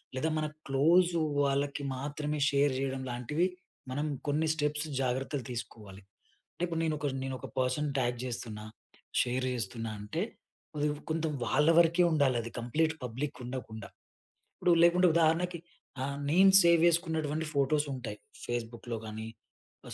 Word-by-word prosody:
లేదా 155 +5 0
మన 155 - 0 0.2
క్లోజు 170 +6 +4 0.2
వాళ్ళకి 140 +1 0
మాత్రమే 145 +2 -3
షేర్ 140 0 +2
జెయడం, 135 0 -2
లాంటివి 125 +9 0 0.4
మనం 145 +3 -1 0.2
కొన్ని 150 +2 +1
స్టెప్స్ 150 0 0
జాగ్రత్తలు 130 +1 -2
తీసుకోవాలి. 105 -4 -8 0.5
అంటే, - - -8
ఇప్పుడు 165 -2 -2
నేను 155 -1 0
ఒకర్ 145 -2 -2
నేను 135 -1 -3
ఒక 135 - -7
పర్సన్ 130 +4 0
ట్యాగ్ 120 -2 0
చేస్తున్నా, 115 -3 -5 0.6
షేర్ 125 +1 -1
చేస్తున్నా 115 -1 -4
అంటే, 105 - -3 0.5
అది 150 0 +1 0.2
కొంచెం 160 -1 0
వాళ్ళ 150 +2 +3
వరకే 170 +1 +4
ఉండాలి 140 -5 +3
అది. 115 - -7
కంప్లీట్ 155 +7 0
పబ్లిక్ 125 +5 -4
ఉండకుండా. 110 -4 -7 0.7
ఇప్పుడు 175 - +3
లేకుంటే, 180 +1 +5
ఉదాహరణకి 170 +2 +2 0.4
ఆహ్, 140 +1 -3
నేను 190 +3 +7
సేవ్ 170 -1 +5
చేసుకున్నటువంటి 160 -2 0
ఫోటోస్ 145 +2 +2
ఉంటాయి. 110 -5 -6 0.3
ఫేస్‌బుక్‌లో 120 0 -4
గానీ, 110 0 -6 0.6
ఆహ్, - - -8
140 Hz, 140 wpm, -30 LUFS, 125-160 Hz, 0.7 s, నేను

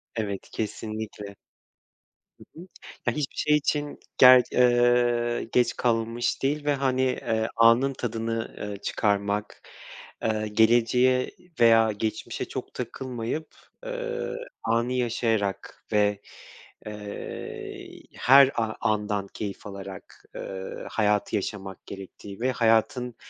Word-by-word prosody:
Evet, 100 -3 -4
kesinlikle. 110 -2 -5 1.0
Hı - - -14 0.2
hı. 180 - -10 0.4
Ya, 125 - +2
hiçbir 150 -3 -3
şey 150 - +3
için 145 0 -1 0.2
ger 125 -1 +9
ııı, 120 -1 +3
geç 120 -1 +2
kalınmış 115 +1 0
değil 145 +2 0
ve, 145 - +3
hani, 130 -1 0
eee, 110 -3 0
anın 115 +4 +5
tadını, 115 -1 -3
ııı, 105 -1 -4
çıkarmak. 100 0 -1 0.6
Iıı, 110 -1 0
geleceğe 120 +4 +3 0.3
veya 115 -1 +6
geçmişe 110 +1 -3
çok - - -7
takılmayıp, 130 +4 -4 0.4
ııı, 485 -2 -4 0.3
anı 115 +2 +1
yaşayarak 115 -5 -1
ve, 105 -1 +2 0.7
ııı, 105 -1 -7 0.2
her 135 +1 +6
a 110 -1 -1
andan 105 -2 0
keyif 100 0 -6
alarak, 100 -1 -10
ııı, 95 0 -6
hayatı 105 0 +1
yaşamak 95 -2 -5
gerektiği 100 +1 -10
ve 130 +2 +1
hayatın 120 +2 +1
115 Hz, 110 wpm, -26 LUFS, 105-125 Hz, 1.0 s, ger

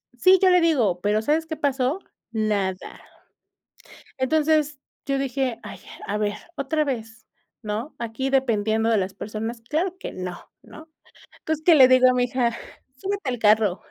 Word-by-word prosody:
Sí, 370 +10 +6
yo 380 - +6
le 360 0 +5
digo, 240 - +2
pero, 210 +3 +1
¿sabes 315 +5 +1
qué 320 - -4
pasó? 280 +2 0 0.3
Nada. 205 -4 -2 1.2
Entonces, 300 +2 +1 0.3
yo 275 -1 -1
dije: 265 -3 -2
"Ay, - - -9 0.3
a 205 - -2
ver, 210 -1 -1 0.2
otra 305 +2 0
vez, 225 -5 -5 0.4
¿no? 220 +7 -5
Aquí 235 +4 -3
dependiendo 225 -4 +1
de 230 - +3
las 190 -1 -1
personas, 220 +3 -5
claro 350 +4 -1
que - - -7
no", 180 -1 -7
¿no? 315 +1 -14 0.5
Entonces, 315 0 -3
que 340 - +7
le 265 -4 +8
digo 255 0 +6
a - - +4
mi 250 0 +2
hija: 240 -1 0 0.4
"Subete 390 0 -3
al 245 - -3
carro". 210 -3 +3
255 Hz, 160 wpm, -24 LUFS, 220-300 Hz, 1.2 s, le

